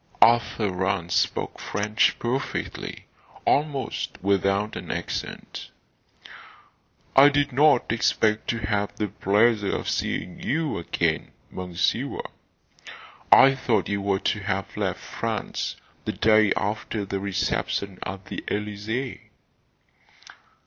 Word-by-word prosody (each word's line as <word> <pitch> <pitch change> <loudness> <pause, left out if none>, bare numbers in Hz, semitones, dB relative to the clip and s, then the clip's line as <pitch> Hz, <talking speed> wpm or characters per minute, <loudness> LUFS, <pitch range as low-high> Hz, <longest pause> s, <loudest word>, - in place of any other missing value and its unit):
Arthur 115 -2 +4
Rance 95 -1 -1
spoke - - 0
French 105 +1 +1
perfectly, 130 +3 -3 0.4
almost 145 -2 0
without 100 +2 +1
an - - -7
accent. - - -5 1.5
"I 140 +2 +9
did 145 -2 +1
not 140 -3 +4
expect 110 -1 +1
to 115 -1 -1
have 100 -1 -1
the 105 -1 -2
pleasure 105 +2 +2
of - - -4
seeing 90 - -2
you 155 - -1
again, 85 -1 -1 0.2
Monsieur. 90 -1 -1 1.1
I 135 +1 +9
thought 125 -4 0
you 100 0 -1
were 100 -1 +1
to 105 - 0
have 95 -2 -3
left - - -1
France - - -3 0.3
the - - -1
day 110 -2 +4
after 105 0 -2
the 100 0 -3
reception 100 0 -2
at 95 0 -6
the - - -6
Elysee." 105 +5 -3
105 Hz, 110 wpm, -25 LUFS, 100-120 Hz, 1.5 s, I